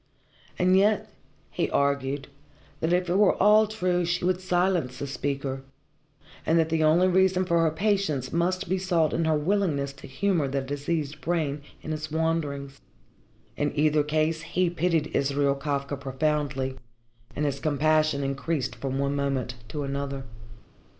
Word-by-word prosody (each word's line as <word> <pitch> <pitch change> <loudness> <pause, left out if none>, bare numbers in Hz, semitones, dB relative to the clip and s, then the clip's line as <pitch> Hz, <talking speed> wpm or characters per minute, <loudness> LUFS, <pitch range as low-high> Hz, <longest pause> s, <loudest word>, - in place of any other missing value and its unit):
And 185 +1 +4
yet 205 +2 +2 0.4
he - - -1
argued 140 0 0 0.5
that 160 - 0
if 180 0 +2
it 175 - 0
were 210 - +5
all 210 +2 +5
true 185 -5 0
she 175 +1 -1
would 185 0 +1
silence 175 -8 0
the 140 - -4
speaker, 135 -1 -3 0.8
and 165 - +2
that 160 -1 +2
the 160 -1 +1
only 165 +4 +5
reason 185 0 +3
for 170 -2 +2
her 165 - +3
patience 160 - 0
must 185 +3 0
be 190 +1 0
sought 175 -4 +1
in 165 - +1
her 160 -1 +2
willingness 150 -5 0
to 140 - -12
humour 160 +2 0
the 135 +1 -1
diseased 145 +2 -3
brain 150 -2 -1 0.2
in 155 - -3
its 155 0 -5
wanderings. 150 -4 -2 0.7
In 145 0 -2
either 150 0 +3
case 155 +2 0
he 170 +1 0
pitied 170 -2 0
Israel 140 0 +2
Kafka 140 0 -2
profoundly, 135 -1 -1 0.6
and 150 - -1
his 140 -1 -1
compassion 155 0 +2
increased 135 -2 -2
from 135 -1 -3
one 140 +1 0
moment 135 -3 -1
to 145 +6 -4
another. 140 0 -3
155 Hz, 155 wpm, -26 LUFS, 140-175 Hz, 0.8 s, were